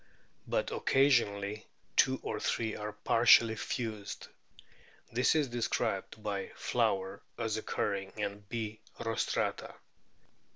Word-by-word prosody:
But - - 0
occasionally 110 -7 +2 0.3
two - - +4
or - - -3
three 110 -2 -1
are 105 0 -4
partially 115 +1 +5
fused. 110 -3 -4 0.8
This 125 +6 +3
is 150 -3 +3
described 120 -1 -2
by - - -3
Flower 95 0 0 0.2
as 110 -2 -1
occurring 100 -3 -2
in 100 -1 -2
B. 110 -2 -4 0.2
rostrata. 115 -1 -1
110 Hz, 100 wpm, -32 LUFS, 100-120 Hz, 0.8 s, partially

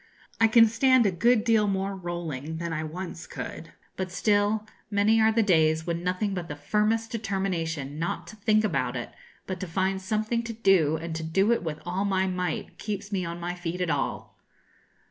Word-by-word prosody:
I 225 - +6
can 225 +1 +7
stand 255 +2 +4
a 200 - +3
good 215 +6 +3
deal 225 -3 +3
more 195 0 -1
rolling 165 -5 -5
than 170 0 -3
I 155 0 -2
once 170 +1 -6
could; 165 - -7 0.2
but 185 -1 -3
still, 205 +2 +2 0.2
many 215 +2 +3
are 220 0 +5
the 225 0 +3
days 160 -4 +3
when 170 0 -2
nothing 185 +3 -1
but 180 -3 -4
the 145 - -5
firmest 215 +9 0
determination 175 - -2
not 170 - -2
to - - -10
think 215 0 +2
about 135 -10 0
it, 120 - -5 0.3
but 185 -2 -4
to 185 - -4
find 190 +3 0
something 215 +4 -1
to 235 0 -5
do, 190 -8 +3
and 160 0 -5
to - - -4
do 190 +7 +2
it 235 - +2
with 160 -3 -4
all 180 +3 -1
my 190 -2 +1
might, 180 -3 -3
keeps 205 -1 -4
me 190 -3 -1
on 170 +1 -5
my 175 +1 -3
feet 175 0 -4
at 180 -2 0
all. - - -3
190 Hz, 200 wpm, -27 LUFS, 165-215 Hz, 0.3 s, can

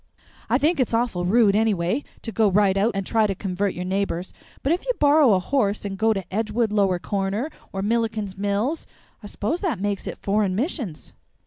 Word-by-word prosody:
"I - - +4
think 315 +2 +1
it's 245 -3 +1
awful 225 -7 0
rude, 210 0 +4
anyway, 215 +3 +1 0.2
to 225 - -4
go 215 +1 +3
right 195 0 +3
out 210 +4 +2
and 195 -1 -2
try 220 0 +2
to 195 - -2
convert 195 +1 -2
your 180 - -4
neighbors; 190 -2 -2 0.3
but 275 - +1
if 355 - -2
you - - 0
borrow 290 -5 +5
a - - +2
horse 205 -1 0
and 195 -1 -3
go 220 +3 +2
to 195 -4 -2
Edgewood 220 +1 0
Lower 195 -3 +2
Corner, 200 - -2 0.2
or 195 0 -3
Milliken's 215 -3 -1
Mills, 205 +10 -1 0.3
I 205 - -8
s'pose 215 +11 -2
that 325 - -1
makes 200 0 -2
it - - -5
Foreign 200 -2 0
Missions." 235 - -3
210 Hz, 200 wpm, -23 LUFS, 195-235 Hz, 0.3 s, borrow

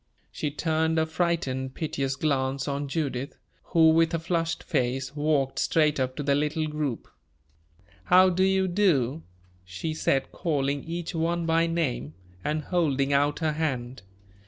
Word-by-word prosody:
She 150 - -3
turned 160 +2 0
a 160 - +3
frightened, 160 -6 -1
piteous 140 -4 -2
glance 135 -2 -1
on 140 0 -2
Judith, 140 -3 -3 0.3
who, 160 -1 +5
with 165 +1 +3
a - - +1
flushed 165 0 -1
face, 130 +2 -1
walked 145 -3 0
straight 150 -3 +2
up 130 0 -1
to 145 - -4
the 140 0 +2
little 150 +2 0
group. 150 -5 -3 1.0
"How 185 +1 +6
do 185 +1 +1
you 190 0 +2
do?" 165 - +1 0.4
she 90 - -5
said, 135 -3 0
calling 140 -4 -1
each 170 +1 -4
one 170 +1 0
by 165 +1 +2
name, 75 - -2 0.3
and 155 +1 -1
holding 145 -5 +1
out 145 +1 +2
her 155 - +2
hand. 130 -5 -3
150 Hz, 150 wpm, -26 LUFS, 135-165 Hz, 1.0 s, How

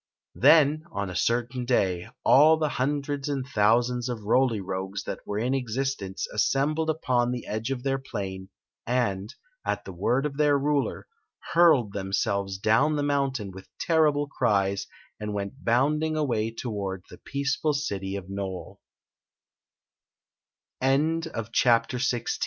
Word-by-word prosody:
Then, 155 0 +5
on 100 - -3
a - - -7
certain 120 +4 0
day, 95 -8 0 0.2
all 155 +4 +7
the 155 -1 0
hundreds 140 +1 -2
and 135 -3 -2
thou 110 +3 +5
sands 125 0 -3
of 115 -4 -4
Roly 115 +1 +2
Rogues 95 +1 -4
that - - -5
were 105 - -3
in 120 +5 0
existence 125 -6 -2
assem 135 +7 +2
• - - -4
bled 160 0 -1
upon 125 -6 +1
the 125 -1 -4
edge 110 +3 -3
of 130 -2 -3
their 135 0 0
plain, 95 -7 -6 0.4
and, 110 -4 0 0.3
at - - -2
the 95 - -7
word 120 +10 0
of 140 -2 -3
their 145 -1 +4
ruler, 145 0 -1 0.5
hurled 155 -12 +5
themselves 100 0 -1
down 115 +10 +3
the 145 - 0
mountain 135 -7 -1
with 95 +1 -12
terrible 150 -3 +2
cries 100 -7 0 0.3
and 105 -1 -4
went 100 +7 -5
bounding 150 +6 +1
away 115 -7 0
toward 100 -5 -4
the - - -12
peaceful 140 +2 -1
city 100 -9 -3
of 95 -2 -6
Nole. 95 -1 -6 2.7
Chapter 120 0 +3
XVII. 120 -1 0
120 Hz, 145 wpm, -26 LUFS, 100-140 Hz, 2.7 s, all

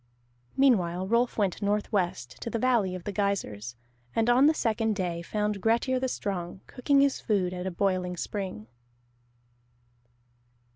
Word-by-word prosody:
Meanwhile 190 -9 +3
Rolf 235 +3 +1
went 200 -4 0
northwest 200 - -1
to - - -4
the 230 - -2
valley 225 -6 +2
of 180 - -7
the 205 - -4
geysirs, 180 - -2 0.4
and 225 +1 +3
on 260 +4 +6
the 315 - +5
second 220 -3 0
day 175 -3 -2
found 210 +2 -2
Grettir 235 +4 +2
the 260 - 0
Strong 190 -6 -4
cooking 275 +2 +2
his 280 -1 +2
food 190 -5 0
at 180 +1 -4
a - - 0
boiling 180 -1 -1
spring. 185 - -4
200 Hz, 145 wpm, -28 LUFS, 180-230 Hz, 0.4 s, on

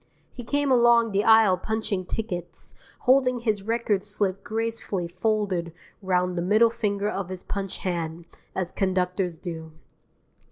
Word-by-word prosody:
He 245 - -8
came 285 +3 0
along 235 -2 +5
the 200 +1 +1
aisle 220 -4 +6
punching 215 -3 -2
tickets, 175 -7 -5 0.3
holding 255 -1 +3
his 215 -4 0
record 220 -2 0
slip 200 -1 -2
gracefully 225 -5 -2
folded 185 -2 -1 0.3
round 180 -1 +1
the 170 - -1
middle 215 +6 +4
finger 205 -3 -1
of 195 -3 -3
his 185 -1 -6
punch 195 -2 -4
hand, 170 -2 -3 0.3
as 180 -2 -2
conductors 185 -2 -1
do. 160 -2 -7
200 Hz, 135 wpm, -25 LUFS, 180-225 Hz, 0.3 s, aisle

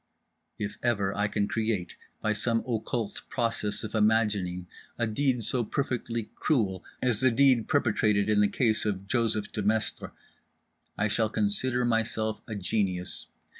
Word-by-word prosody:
If 105 -1 -4
ever 100 -5 +1
I 105 +1 +1
can 100 0 0
create 110 -6 -1 0.3
by 110 - +1
some 115 +1 0
occult 115 -2 -2
process 115 -4 -1
of 110 - -5
imagining 105 -5 +2 0.3
a 120 - +1
deed 125 +2 0
so 125 +3 +1
perfectly 115 -2 -2
cruel 100 - 0 0.2
as 120 -5 +2
the 130 - +5
deed 125 -1 +4
perpetrated 110 -7 +2
in 105 -1 +4
the 105 - +5
case 110 0 +1
of 100 -2 -2
Joseph 110 -1 0
Demestre, 105 +1 -1 0.9
I 105 - +2
shall 110 +1 +1
consider 115 +4 0
myself 110 -2 0
a 110 - -4
genius. 95 -2 -2
110 Hz, 140 wpm, -28 LUFS, 105-115 Hz, 0.9 s, the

